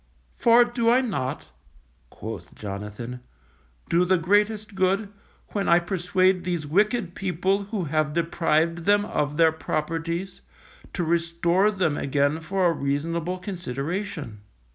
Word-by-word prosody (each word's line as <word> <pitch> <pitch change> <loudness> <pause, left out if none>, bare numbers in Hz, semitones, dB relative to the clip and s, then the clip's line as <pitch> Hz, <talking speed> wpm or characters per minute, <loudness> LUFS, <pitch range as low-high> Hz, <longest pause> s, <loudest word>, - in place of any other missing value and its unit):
For 240 +1 +5
do 235 -1 0
I 250 +2 +5
not, 190 - -3 0.6
quoth 110 -1 -8
Jonathan, 105 +5 -6 0.7
_do 175 +2 +2
the 185 0 +4
greatest 210 +4 +1
good, 195 +2 +1 0.4
when 200 -1 -1
I 170 - +7
persuade 185 +1 +1
these 175 -4 -2
wicked 205 +4 +1
people 190 +2 0
who 205 -2 -3
have 155 -1 0
deprived 165 0 +1
them 205 0 +4
of 150 -5 -2
their 165 -1 +5
properties, 165 +3 -3 0.5
to 175 - -1
restore 170 +3 +2
them 185 -8 0
again 145 +2 +1
for 185 +3 -1
a 175 - +5
reasonable 165 +5 -2
consideration. 175 - -5
170 Hz, 125 wpm, -25 LUFS, 155-195 Hz, 0.7 s, I